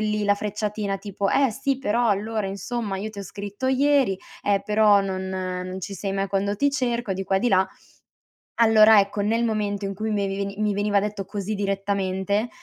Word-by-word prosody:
lì 210 Hz, -1 st, 0 dB
la 205 Hz, 0 st, +4 dB
frecciatina 210 Hz, -1 st, -3 dB
tipo: 200 Hz, -1 st, -3 dB
"Eh 270 Hz, -2 st, +3 dB
sì, 270 Hz, +3 st, -1 dB
però 240 Hz, -2 st, +1 dB
allora, 210 Hz, +1 st, -1 dB
insomma, 200 Hz, +1 st, -3 dB
io 215 Hz, +3 st, -4 dB
ti 210 Hz, -, -11 dB
ho -, -, -5 dB
scritto 205 Hz, +5 st, -6 dB
ieri, 265 Hz, -6 st, +3 dB, 0.2 s
eh 200 Hz, -1 st, +1 dB
però 210 Hz, -1 st, +5 dB
non 190 Hz, -1 st, -3 dB
non 185 Hz, 0 st, -4 dB
ci 195 Hz, +2 st, -6 dB
sei 195 Hz, +1 st, -3 dB
mai 195 Hz, 0 st, -1 dB
quando 200 Hz, +1 st, -1 dB
ti 285 Hz, +5 st, +2 dB
cerco." 240 Hz, -6 st, -1 dB
Di 190 Hz, +1 st, -3 dB
qua 195 Hz, -, +1 dB
e -, -, +3 dB
di 245 Hz, -, +2 dB
là, 190 Hz, -3 st, +3 dB, 1.0 s
allora 220 Hz, -1 st, +7 dB
ecco, 200 Hz, +1 st, 0 dB
nel 225 Hz, +3 st, +1 dB
momento 205 Hz, -2 st, -1 dB
in 195 Hz, -, -3 dB
cui 215 Hz, +2 st, -3 dB
me 200 Hz, -2 st, 0 dB
veni 200 Hz, 0 st, -3 dB
mi 210 Hz, -1 st, +1 dB
veniva 205 Hz, 0 st, +2 dB
detto 210 Hz, -1 st, -3 dB
così 205 Hz, +1 st, -4 dB
direttamente, 200 Hz, +1 st, -1 dB
205 Hz, 200 wpm, -24 LUFS, 195-220 Hz, 1.0 s, allora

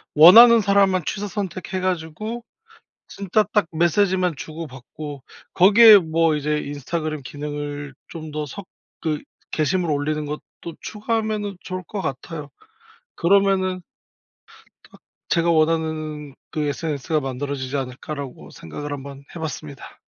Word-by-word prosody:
원하는 225 Hz, +10 st, +10 dB
사람만 195 Hz, -2 st, +3 dB
취사선택해 195 Hz, -2 st, -4 dB
가지고 185 Hz, +6 st, -3 dB, 0.6 s
진짜 200 Hz, +2 st, 0 dB
딱 210 Hz, -5 st, +3 dB
메시지만 180 Hz, +1 st, +2 dB
주고받고 145 Hz, -2 st, -8 dB, 0.3 s
거기에 210 Hz, +4 st, +9 dB
뭐 160 Hz, -1 st, +2 dB
이제 150 Hz, +1 st, 0 dB
인스타그램 150 Hz, +1 st, -4 dB
기능을 145 Hz, 0 st, -6 dB
좀 160 Hz, -2 st, -8 dB
더 150 Hz, 0 st, -2 dB
섞으 160 Hz, -2 st, -6 dB, 0.3 s
게시물을 160 Hz, +1 st, +1 dB
올리는 150 Hz, +1 st, -2 dB
것도 150 Hz, +2 st, -8 dB
추가하면은 215 Hz, -2 st, -2 dB
좋을 185 Hz, 0 st, -5 dB
것 205 Hz, -, -4 dB
같아요. 145 Hz, +1 st, -5 dB, 0.7 s
'그러면은' 185 Hz, 0 st, +2 dB, 1.0 s
'딱 -, -, -19 dB, 0.3 s
제가 170 Hz, 0 st, +2 dB
원하는 155 Hz, -2 st, 0 dB, 0.2 s
그 155 Hz, -, -2 dB
SNS가 150 Hz, 0 st, -1 dB
만들어지지 135 Hz, +1 st, -3 dB
않을까?'라고 135 Hz, +1 st, -6 dB
생각을 145 Hz, -, -7 dB
한번 140 Hz, 0 st, -8 dB
해 -, -, -6 dB
봤습니다. 155 Hz, -3 st, -7 dB
160 Hz, 290 characters per minute, -22 LUFS, 145-185 Hz, 1.0 s, 원하는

